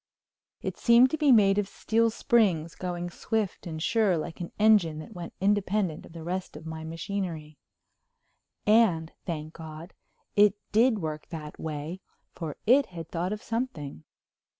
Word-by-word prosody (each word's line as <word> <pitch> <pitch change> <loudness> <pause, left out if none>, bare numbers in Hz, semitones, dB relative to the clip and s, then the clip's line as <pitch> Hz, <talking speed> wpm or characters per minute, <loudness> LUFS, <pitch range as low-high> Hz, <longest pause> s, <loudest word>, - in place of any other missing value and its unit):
It - - -4
seemed 240 +2 +6
to 315 - 0
be 295 -3 +5
made 205 -4 +6
of 205 - -1
steel 230 +3 +1
springs 190 -8 +2
going 175 -1 -4
swift 215 -1 -2
and 160 -2 -5
sure 210 -1 +2
like 160 +2 -5
an 170 - -5
engine 205 -7 +4
that 155 +8 -9
went 175 -3 -8
independent 195 -3 0
of - - -16
the 165 -1 -8
rest 180 -1 -4
of 155 - -11
my 160 0 -6
machinery. 165 -2 -5 1.1
And, 200 -7 +4 0.2
thank 155 -2 -4
God, 160 +2 -9 0.4
it 205 -1 +6 0.2
did 225 +2 +4
work 155 -1 -4
that 155 -2 -8
way, 160 +4 -5 0.3
for 160 -4 -6
it 270 +5 +5
had 165 -3 -8
thought 175 +2 -2
of 210 0 -4
something! 170 - -4
180 Hz, 155 wpm, -28 LUFS, 160-215 Hz, 1.1 s, seemed